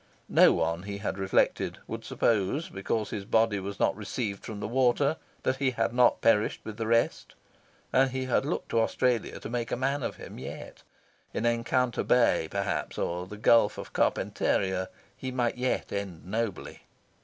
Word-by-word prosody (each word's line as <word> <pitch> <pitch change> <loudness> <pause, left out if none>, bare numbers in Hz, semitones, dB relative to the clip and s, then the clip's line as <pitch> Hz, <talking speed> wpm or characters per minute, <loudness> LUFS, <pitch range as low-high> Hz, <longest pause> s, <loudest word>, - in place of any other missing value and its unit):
No - - +7
one, 85 +1 0
he 100 +1 -5
had 100 -1 -4
reflected, 95 0 +1
would - - -6
suppose 115 - 0
because 105 +3 -2
his 105 - -4
body 110 0 +2
was 100 +1 -6
not 95 - +2
retrieved 105 0 -4
from 110 -3 -6
the - - -3
water 130 +5 +2 0.3
that 130 - +1
he 135 -1 +2
had 120 -1 -1
not 125 -1 +4
perished 110 -2 +3
with 110 -1 -7
the 115 -1 -2
rest. 115 +1 +1 0.6
And 135 +1 +4
he 130 0 -3
had 130 - +2
looked 150 +5 -3
to 115 - +2
Australia 120 0 0
to - - -7
make 120 +1 -3
a - - +1
man 135 +3 0
of - - -3
him - - -10
yet: - - -8 0.5
in 115 - -1
Encounter 120 +1 +1
Bay, 120 -9 +3
perhaps, 100 -1 -2
or 90 +1 -2
in - - -16
the 105 - -8
Gulf 115 +2 +4
of - - -8
Carpentaria, 95 -1 0 0.3
he 130 - -5
might 125 -1 -1
yet 125 0 -1
end 100 -5 -5
nobly. 110 0 -3
115 Hz, 180 wpm, -28 LUFS, 100-125 Hz, 0.6 s, No